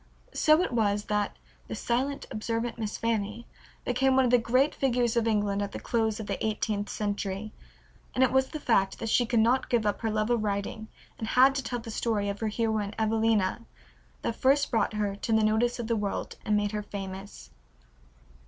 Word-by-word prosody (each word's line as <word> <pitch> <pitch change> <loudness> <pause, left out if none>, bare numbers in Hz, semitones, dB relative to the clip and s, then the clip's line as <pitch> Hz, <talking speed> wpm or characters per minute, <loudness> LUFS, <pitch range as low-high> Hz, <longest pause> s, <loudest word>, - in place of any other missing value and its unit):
So 310 +3 +4
it - - -2
was 205 -3 +1
that 210 -1 -1 0.3
"the - - -5
silent, 265 +4 -1
observant 230 +2 -3
Miss 215 -2 -3
Fanny" 225 0 -2 0.4
became 260 +2 +2
one 265 0 +5
of 240 - +1
the 245 - +6
great 255 +5 +2
figures 245 -3 +1
of 230 -1 +2
England 205 -2 +1
at 200 0 -3
the - - -5
close 220 -2 0
of 220 - -5
the 200 -1 -3
eighteenth 210 -1 -1
century, 205 0 -3 0.6
and 260 - +4
it 260 - +3
was 265 0 +3
the 310 - -6
fact 195 -8 +2
that 225 - -4
she 240 +1 +3
could 235 -1 +2
not 250 +4 +2
give 235 -3 +2
up 205 - 0
her 225 - 0
love 215 +2 0
of 235 -3 +2
writing 205 +1 -3 0.3
and 220 - -3
had 260 +4 +5
to 270 - -1
tell 245 - -3
the 230 -1 -7
story 210 -2 0
of 200 0 -4
her 220 - -1
heroine 215 -2 -1
Evelina 220 -2 +1 0.6
that 230 - -1
first 280 +2 +3
brought 225 -2 +1
her 205 -2 -1
to 225 - -2
the 220 0 +4
notice 220 +3 +2
of 240 - -4
the 230 +1 0
world 205 -2 -3
and 210 0 +2
made 205 -1 0
her 210 -1 -2
famous. 195 -1 -8
220 Hz, 205 wpm, -28 LUFS, 210-240 Hz, 0.6 s, the